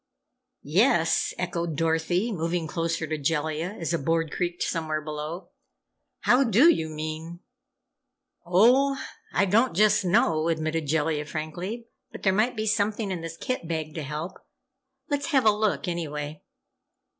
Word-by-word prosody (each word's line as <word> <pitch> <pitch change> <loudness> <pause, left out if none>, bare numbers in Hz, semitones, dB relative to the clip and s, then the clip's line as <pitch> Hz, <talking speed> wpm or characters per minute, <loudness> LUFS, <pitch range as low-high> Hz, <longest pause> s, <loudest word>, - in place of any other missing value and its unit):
"Yes," 165 - +3
echoed 170 -3 -2
Dorothy, 165 +6 +1
moving 170 -2 -1
closer 165 0 -2
to 155 0 -3
Jellia 160 +5 -1
as 165 0 -2
a 170 - +1
board 165 +2 0
creaked 175 0 -2
somewhere 155 -2 -1
below. 155 +3 -6 0.7
"How 250 +3 +4
do 250 - +6
you 160 -1 -3
mean?" 155 +2 -6 1.0
"Oh, 245 +10 +4 0.3
I 200 - +2
don't 225 +5 +2
just 210 +1 +4
know," 175 -5 +2
admitted 160 -1 -1
Jellia, 150 0 0
frankly. 175 +10 -5 0.3
"But - - -10
there 190 - +3
might 220 +6 +1
be 215 - -1
something 210 -1 0
in 180 -3 -3
this 165 0 -7
kit 255 -7 -3
bag 160 -2 -3
to 160 - -4
help! 150 +6 -5 0.7
Let's 285 0 -1
have 270 -7 +2
a 215 - +7
look, 210 -2 0
anyway." 150 -3 -4
170 Hz, 145 wpm, -26 LUFS, 155-205 Hz, 1.0 s, a